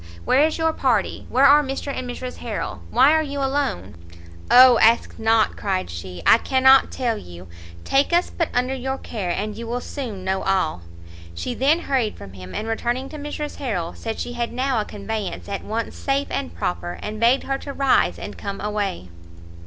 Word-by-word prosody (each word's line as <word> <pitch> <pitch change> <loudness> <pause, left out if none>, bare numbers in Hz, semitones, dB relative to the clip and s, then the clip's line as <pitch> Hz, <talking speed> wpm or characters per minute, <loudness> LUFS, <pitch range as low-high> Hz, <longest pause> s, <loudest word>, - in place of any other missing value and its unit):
Where 265 - +4
is 320 - -4
your 320 -1 +1
party? 245 -9 0
where 265 +2 +4
are 290 +2 +7
Mr 275 0 -4
and 255 -1 -5
Mrs 250 +1 -6
Harrel? - - -5
Why 265 +5 +5
are 315 - +3
you 285 -2 -5
alone?" 265 - -2 0.5
"O 250 -1 +8
ask 230 +2 +3
not!" 225 0 +2
cried 190 - -2
she, 85 0 -8
"I 230 - +7
cannot 265 +1 +5
tell 235 -4 -1
you! 90 +1 -12 0.4
take 275 +4 +2
us 345 +1 +2
but 335 - -1
under 250 +2 0
your 265 +1 -3
care, 205 -9 -5
and 205 +4 -2
you 230 +1 -7
will 240 +2 -2
soon 240 -8 -6
know 190 0 -1
all." 185 - 0 0.5
She 165 - -3
then 285 +7 +2
hurried 255 -9 -1
from 95 - -11
him, 95 -1 -10
and 220 - -3
returning 240 +4 -2
to 305 - -8
Mrs 295 0 -5
Harrel, 190 -11 -3
said 225 -1 -5
she 245 - -4
had 240 -1 -3
now 255 -2 0
a - - -5
conveyance 210 -1 -5
at 200 -1 -4
once 225 +2 -4
safe 275 0 -1
and 85 -1 -3
proper, 85 0 -3
and 215 +1 -5
begged 240 +4 +3
her 270 0 -2
to 280 - -7
rise 275 -1 +2
and - - -7
come 200 -1 -5
away. 205 - -3
235 Hz, 195 wpm, -22 LUFS, 195-270 Hz, 0.5 s, O